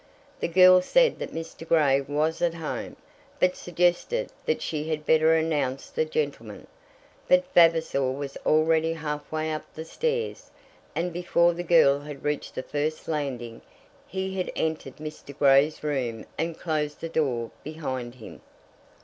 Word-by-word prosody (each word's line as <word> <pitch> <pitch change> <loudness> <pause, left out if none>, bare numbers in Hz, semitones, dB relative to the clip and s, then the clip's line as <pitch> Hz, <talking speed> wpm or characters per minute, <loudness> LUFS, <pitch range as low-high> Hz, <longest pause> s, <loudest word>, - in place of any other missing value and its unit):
The - - -1
girl 185 +1 +7
said - - +3
that - - -5
Mr. 165 0 -7
Grey 145 -5 +4
was 150 +4 -1
at 170 -1 +1
home, 160 -2 -5 0.4
but 180 0 +3
suggested 180 - 0 0.2
that 470 - +1
she 155 0 -3
had 155 -1 -2
better 160 +1 +4
announce 150 -5 -1
the 475 0 0
gentleman. 465 0 -4 0.6
But 275 0 +4
Vavasor 165 -6 +4
was 140 +1 -5
already 160 +1 +3
halfway 155 0 -3
up 155 - -4
the 160 - -6
stairs, 470 - -3 0.5
and 175 +1 -1
before 175 0 +2
the 175 - -4
girl 160 -5 +5
had 145 -1 -9
reached 150 0 -3
the 130 - -3
first 150 +3 -3
landing 130 -7 -3
place, - - -28 0.4
he 190 0 -4
had 185 - -2
entered 160 -4 -2
Mr. 150 -2 -9
Grey's 140 +2 +4
room 125 -7 -2
and 165 0 -3
closed 150 -3 -2
the 165 - -4
door 130 -8 -1
behind 130 -6 -5
him. 115 -4 -12
155 Hz, 150 wpm, -26 LUFS, 145-170 Hz, 0.6 s, girl